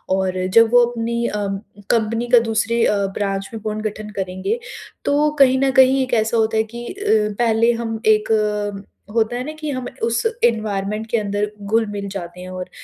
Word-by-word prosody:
और 185 -1 -1
जब 230 0 +6
वो 245 -1 +7
अपनी 235 0 -2
अम 200 -2 -2 0.3
कंपनी 230 +1 0
का 240 -1 +7
दूसरे 230 +1 +1
अ, - - +2 0.2
ब्रांच 195 -1 -2
में 225 - -6
पुर्नगठन 215 0 -4
करेंगे, 190 - -2 0.5
तो 295 +1 +3
कहीं 260 -1 +5
न 270 - +3
कहीं 265 +1 +5
एक 255 - -5
ऐसा 225 0 +2
होता 220 0 +1
है 220 - +3
कि 240 0 -6
अ, 400 - -12 0.4
पहले 230 0 +3
हम 230 -1 -3
एक 210 -2 +1 0.3
होता 225 +1 +1
है 250 - -3
ना, 300 - -5
कि 310 -1 -6
हम 255 -2 -4 0.2
उस 230 0 +1 0.2
एनवायरनमेंट 215 -2 0
के 235 - +3
अंदर 205 0 -1
घुल-मिल 205 -1 -1
जाते 180 -2 -7
हैं 185 - -8
और 185 0 -6
220 Hz, 180 wpm, -20 LUFS, 205-235 Hz, 0.5 s, वो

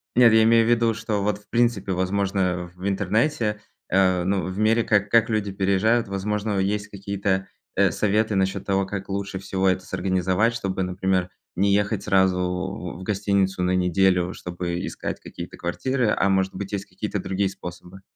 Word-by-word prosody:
Нет, 120 -2 +7
я 110 0 +6
имею 115 0 +5
в - - +2
виду, 115 -1 +3
что 105 -2 -2
вот, 105 0 0
в 105 - -26
принципе, 115 -5 +1
возможно, 95 -1 0
в 95 +2 -5
интернете, 105 +3 0 0.3
э, 95 -2 +3
ну, 95 -2 +1
в 95 +1 -5
мире, 110 +2 +3
как 105 -1 +2
как 115 0 +4
люди 105 -2 -1
переезжают, 100 +4 +2
возможно, 105 +1 -2
есть 105 +2 -1
какие-то, 100 -1 -2 0.3
э, - - +3
советы 105 0 +1
насчёт 95 0 0
того, 95 -1 +1
как 95 0 -6
лучше 100 -1 -3
всего 95 0 -1
это 95 0 -1
с - - -15
организовать, 95 +4 +1
чтобы, 95 -4 -2
например, 90 0 0 0.3
не 100 +1 +2
ехать 100 0 0
сразу 95 -1 +3
в 90 -1 -4
в - - -8
гостиницу 100 -2 0
на 90 +1 +2
неделю, 90 0 +2
чтобы 90 0 -4
искать - - -5
какие-то - - -9
квартиры, 120 +6 -1
а 100 - +2
может 95 0 +1
быть, 100 0 -5
есть 100 0 -2
какие-то - - -4
другие 95 0 -1
способы. 90 +1 -10
95 Hz, 180 wpm, -24 LUFS, 95-105 Hz, 0.3 s, Нет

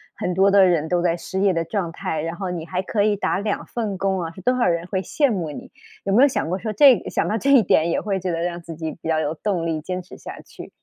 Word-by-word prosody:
很 180 - -2
多 195 +2 +4
的 195 -1 +6
人 165 -4 +1
都 175 -1 +1
在 170 -1 +1
失 190 +2 -5
业 195 -1 +3
的 165 -1 0
状 175 +1 -3
态， 170 -5 -3
然 165 +2 -4
后 190 0 -4
你 170 -3 -4
还 180 +3 -2
可 205 +2 0
以 210 0 +2
打 200 - -1
2 205 0 -2
份 215 -5 -4
工 190 -1 0
啊， 165 - -5
是 190 - -12
多 250 +7 +2
少 245 - +2
人 170 -1 0
会 190 -1 -2
羡 280 +5 +1
慕 175 -6 -2
你。 - - -10 0.3
有 195 - -1
没 240 +6 +6
有 - - +7
想 260 - -2
过 185 - -1
说 215 +2 -4
这 265 +4 +7
一 190 - -7
想 - - 0
到 220 - 0
这 275 +5 +1
一 255 -5 +7
点 160 -3 +2
也 - - 0
会 195 -2 -2
觉 185 -1 -3
得 165 - -2
让 175 0 -3
自 165 -1 -9
己 160 0 -4
比 - - -6
较 160 -1 +1
有 150 0 -1
动 180 -1 -2
力 160 -1 -1
坚 180 +4 -4
持 180 - -13
下 - - -9
去？ - - -12
185 Hz, 320 characters per minute, -22 LUFS, 165-205 Hz, 0.3 s, 有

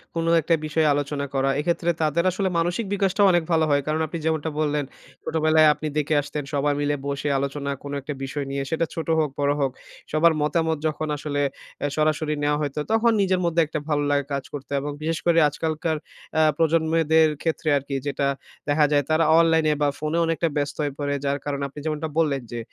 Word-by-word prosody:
কোনো 165 0 0
একটা 165 +2 +1
বিষয়ে 155 0 +1
আলোচনা 145 0 -2
করা। 135 0 +1
এক্ষেত্রে 170 +2 0
তাদের 155 +2 +1
আসলে 190 +1 -1
মানসিক 175 +6 0
বিকাশটাও 195 +1 +2
অনেক 175 -2 +2
ভালো 160 -1 +3
হয়। 145 0 +3
কারণ 155 +1 0
আপনি 170 - -5
যেমনটা 160 -1 0
বললেন, 150 -1 0 0.4
ছোটবেলায় 155 0 +3
আপনি 155 - -5
দেখে 150 +1 0
আসতেন 145 0 -5
সবাই 145 +1 +1
মিলে 145 0 +1
বসে 140 +1 -2
আলোচনা 140 +1 -2
কোন 140 - -6
একটা 150 +2 -5
বিষয় 140 +1 -3
নিয়ে। 140 0 -2
সেটা 160 +1 +1
ছোট 165 - -4
হোক 155 -2 +1
বড় 140 0 +2
হোক 135 -2 +1 0.4
সবার 160 +2 +4
মতামত 160 +1 +1
যখন 155 0 -3
আসলে 145 0 -2 0.4
অ্যা 145 - -1
সরাসরি 155 0 +1
নেয়া 145 0 +2
হইতো 145 0 -2
তখন 230 +1 +4
নিজের 185 -1 +2
মধ্যে 170 0 +2
একটা 155 - -3
ভালো 145 -1 +1
লাগা 140 -1 +1
কাজ 140 -1 -2
করতো। 145 -1 -7
এবং 145 - -4
বিশেষ 160 +1 -1
করে 170 -1 +4
আজকালকার 155 +1 -2 0.4
অ্যা 155 - +4
প্রজন্মদের 160 -1 +3
ক্ষেত্রে 160 -1 -1
আরকি 140 0 -4
যেটা 140 0 0 0.4
দেখা 150 +1 +4
যায় 145 -1 +3
তারা 155 +1 +3 0.2
অনলাইনে 160 -2 +3
বা 145 - +3
ফোনে 155 +2 -1
অনেকটা 165 +1 0
ব্যস্ত 145 0 -1
হয়ে 145 -2 -2
পড়ে। 145 0 -1
যার 140 0 +1
কারণ 140 -1 -2
আপনি 140 +2 -10
যেমনটা 155 0 -2
বললেন, 145 -5 +2
যে 120 - -4
155 Hz, 200 wpm, -24 LUFS, 145-160 Hz, 0.4 s, সবার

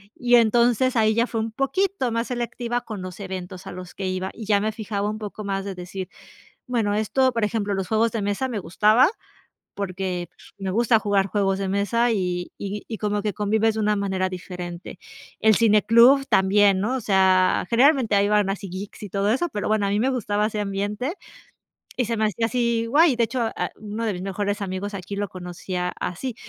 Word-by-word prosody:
Y, 245 0 +3
entonces, 240 +2 +3
ahí 220 -1 +3
ya 235 - +3
fue 225 - -2
un 225 0 -3
poquito 270 - 0
más 230 +1 -1
selectiva 240 0 -3
con 215 -4 -7
los 185 +1 -8
eventos 185 -2 -7
a - - -6
los 180 -1 -9
que 195 - -3
iba 185 0 -2
y 225 - -8
ya 205 -1 +3
me 215 +1 0
fijaba 210 -1 -3
un 215 - -4
poco 210 0 -7
más 195 0 -2
de 200 - -4
decir, 180 +1 -6 0.6
bueno, 230 -5 0
esto, 255 +5 +2
por 230 -2 -2
ejemplo, 205 -1 -1
los 195 -1 -3
juegos 220 0 +2
de 225 - -2
mesa 205 +6 -1
me 230 -5 -3
gustaba 215 - +4 0.7
porque 185 -3 -3 0.3
me 195 -1 -3
gusta 225 +3 +3
jugar 200 -2 +1
juegos 195 -1 0
de 195 -1 -2
mesa 230 +5 +1
y 180 -3 -2
y 205 +1 -5
y 220 - -5
como 210 0 -1
que 210 -3 -2
convives 220 +1 +1
de 220 - -2
una 210 0 +2
manera 190 -2 -1
diferente. 180 -1 -7 0.4
El 220 -2 +5
cine 215 -2 +4
club 245 +5 +6
también, 195 0 +4
¿no? 220 +6 0
O - - -3
sea, 190 -2 +3
generalmente 250 -2 +4
ahí 200 0 +3
van 210 -1 +2
así 195 0 -4
geeks 195 +4 -8
y 205 - -6
todo 200 +2 0
eso, 305 +8 0
pero, 205 - -3
bueno, 215 -1 +2
a - - -1
mí 205 - +1
me 260 +4 +2
gustaba 210 -4 0
ese 215 -1 -3
ambiente, 205 - -2 0.8
y 250 - 0
se 230 - -1
me 220 - +1
hacía 220 +2 0
así 235 -1 0
guay. 295 +2 +4
De 235 - +3
hecho, 250 +2 -3 0.2
ah, - - -2
uno 215 +2 -4
de 220 - 0
mis 180 - -6
mejores 200 +1 -2
amigos 195 +2 -4
aquí 200 +1 -6
lo 205 0 -2
conocí 180 0 -7
a 180 0 0
así. 220 +8 -4
210 Hz, 215 wpm, -23 LUFS, 195-230 Hz, 0.8 s, club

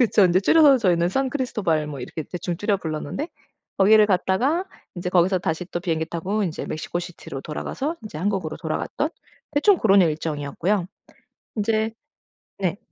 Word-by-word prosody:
그쵸. 215 -4 +5
인제 180 +1 +4
줄여서 285 +3 +6
저희는 175 -5 +2
산크리스토발 245 - 0
이렇게 145 +1 -6
대충 175 -1 -3
줄여 205 +1 +1
불렀는데 160 - -4 0.5
거기를 210 +2 +6
갔다가 225 - +1 0.3
인제 180 +1 -3
거기서 185 +1 +3
다시 165 +1 -2
또 175 - -4
비행기 160 -3 -1
타고 190 +6 -2
인제 165 - -4
멕시코시티로 175 -3 -5
돌아가서 275 - -4
인제 215 -8 -8
한국으로 190 -4 -1
돌아갔던 170 - -2 0.4
대충 345 +6 +4
그런 200 -2 +5
일정이었고요. 160 +4 -1 0.7
인제 220 +1 +1 0.7
네. 185 0 0
185 Hz, 375 characters per minute, -23 LUFS, 165-220 Hz, 0.7 s, 줄여서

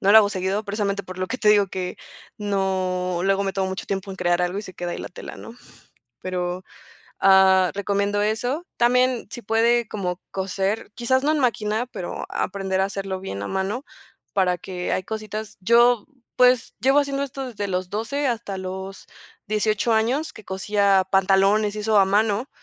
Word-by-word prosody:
no 200 +1 +4
lo 220 - +11
hago 205 -2 +5
seguido, 195 +1 -1
precisamente 200 -1 -2
por 185 -1 -9
lo 185 - -1
que 255 +6 -4
te 215 - +2
digo 205 -2 +5
que 185 -1 -4 0.4
no 185 -3 -1
luego 195 0 +2
me 195 - -1
tomo 190 -1 0
mucho 190 - -5
tiempo 195 0 -3
en 190 - -7
crear 175 0 +1
algo 180 +3 -1
y - - -4
se 185 - -10
queda 175 0 -4
ahí - - -4
la - - -6
tela 175 - -9
¿no? 230 - -10 0.7
Pero, 180 0 -3 0.6
ah, 190 -1 +6
recomiendo 200 +1 0
eso. 245 +9 -1
También, 250 0 +2
si 240 - -8
puede 230 +2 +2
como 180 -4 -3
coser, 195 +2 -2
quizás 260 +2 +1
no 300 - +3
en 310 - +1
máquina, 230 -2 0
pero 180 -7 -6
aprender 190 -1 -1
a - - +3
hacerlo 195 -1 -3
bien 100 - -5
a - - -4
mano, 195 +8 -2 0.5
para 180 -2 +2
que 180 0 -4
hay - - 0
cositas 215 +1 -6
yo, 235 +2 +4 0.3
pues, 250 -1 +4
llevo 270 +4 +4
haciendo 280 -1 -1
esto 270 -1 -5
desde 205 -4 -4
los 180 -1 -2
12 275 +7 -2
hasta 220 -5 -3
los 190 +1 -6 0.4
18 215 +2 +1
años 250 +8 +1
que 215 - -13
cosía 195 0 +2
pantalones 195 +2 +3
y 210 - -3
eso 215 -1 +3
a 195 - +7
mano, 210 +5 +1
200 Hz, 185 wpm, -23 LUFS, 190-225 Hz, 0.7 s, lo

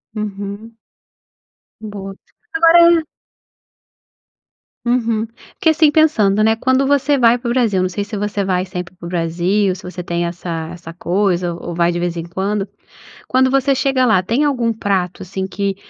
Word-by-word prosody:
Uhum. 205 +1 -6 1.1
Boa. 200 -2 -7 0.4
Agora 340 -3 +6 1.8
Uhum. 230 -2 0 0.3
Porque, 320 - +3
assim, 315 -1 +4
pensando, 220 -11 +3
né, 220 +1 +3
quando 260 +4 +1
você 285 +1 +2
vai 240 -2 +4
para 240 0 -7
o - - 0
Brasil, 220 -7 +1
não 185 - 0
sei 195 +3 -3
se 210 +1 -6
você 205 0 -2
vai 185 -1 0
sempre 180 -1 -7
para 175 - -11
o - - -5
Brasil, 180 +3 0
se 185 - -12
você 180 0 -6
tem 170 0 -2
essa 170 -2 -5
essa 170 -1 -10
coisa 180 0 0
ou 170 0 -7
vai 170 0 +2
de 175 - -3
vez 175 -1 -2
em 165 - -3
quando, 195 +4 -2 0.6
quando 260 0 +2
você 275 +1 +2
chega 270 -1 +1
lá, 220 -6 +4
tem 230 +10 0
algum 245 -6 +1
prato, 190 -4 -2
assim, 190 +1 -4
que 200 0 -2
205 Hz, 165 wpm, -18 LUFS, 180-245 Hz, 1.8 s, Agora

